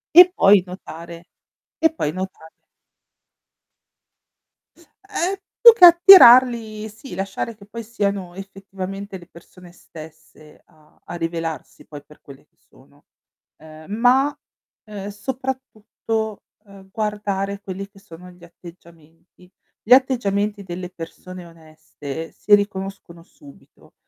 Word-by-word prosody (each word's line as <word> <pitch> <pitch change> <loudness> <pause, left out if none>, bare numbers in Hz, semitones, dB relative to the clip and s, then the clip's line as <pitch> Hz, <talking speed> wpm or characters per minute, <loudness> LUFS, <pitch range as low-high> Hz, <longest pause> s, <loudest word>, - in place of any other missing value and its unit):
E 360 +1 +10
poi 195 0 +5
notare 170 -2 -11 0.5
e 320 -1 +2
poi 150 - -3
notare 185 -2 -8 2.6
Ehm, 380 -2 -2 0.3
più 470 -1 +10
che 390 -6 +7
attirarli, 245 - +6
sì, 220 +4 -13
lasciare 195 +4 -5
che 200 -1 -17
poi 230 +3 -9
siano 200 -5 -4
effettivamente 195 0 -9
le 175 -2 -17
persone 175 +1 -17
stesse 155 -2 -16
a 155 -1 -28
a - - -9
rivelarsi 165 -1 -6
poi 145 -2 -12
per 150 - -20
quelle 140 -1 -16
che - - -50
sono, - - -26 0.5
ehm, 155 +3 -15
ma, 255 +6 +2 0.5
ehm, 205 -2 -8
soprattutto, 225 -2 -6 0.2
uhm, 195 -1 -17
guardare 200 -2 -4
quelli 195 0 -8
che 200 - -20
sono 180 -3 -14
gli 180 -1 -21
atteggiamenti. 170 0 -18 0.3
Gli 240 - +5
atteggiamenti 210 -6 +1
delle 180 0 -8
persone 180 +1 -11
oneste 160 -2 -11
si 210 - -1
riconoscono 195 -4 -6
subito. 285 - -20
195 Hz, 115 wpm, -20 LUFS, 170-220 Hz, 2.6 s, E